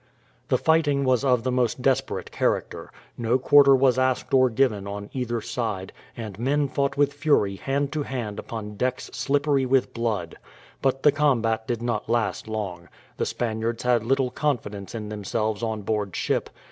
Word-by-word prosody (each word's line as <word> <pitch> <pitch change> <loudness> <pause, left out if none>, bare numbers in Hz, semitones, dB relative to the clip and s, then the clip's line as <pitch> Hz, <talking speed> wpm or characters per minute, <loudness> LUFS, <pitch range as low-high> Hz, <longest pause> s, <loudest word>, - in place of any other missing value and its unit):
The - - +2
fighting 155 -3 +2
was 130 -1 +2
of 125 -4 +2
the 130 - 0
most 125 0 0
desperate 135 -1 0
character; - - -1 0.3
no 120 +2 +2
quarter 140 +1 +6
was 130 -1 +3
asked 130 -1 0
or 130 -1 +5
given 110 -5 +1
on 100 0 -6
either 120 -3 -2
side, 105 -7 -3 0.2
and 110 -4 -7
men 140 +4 +1
fought 140 0 -1
with 145 0 +3
fury 140 -10 +2
hand 140 +3 -1
to 155 - -1
hand 120 -7 -4
upon 105 -2 -6
decks 130 +2 -2
slippery 140 -1 +1
with 130 0 +2
blood. 110 -8 -2 0.4
But 135 0 0
the 150 - +7
combat 115 -7 +1
did 120 -1 -2
not 115 -3 -2
last 115 -1 0
long. 95 -6 -5 0.3
The - - -1
Spaniards 115 0 -2
had 120 -3 +2
little 130 +1 +1
confidence 110 -9 -2
in 105 -2 -5
themselves 105 +1 -2
on 110 -2 -2
board 105 -2 -2
ship. - - -1
120 Hz, 170 wpm, -25 LUFS, 110-135 Hz, 0.4 s, the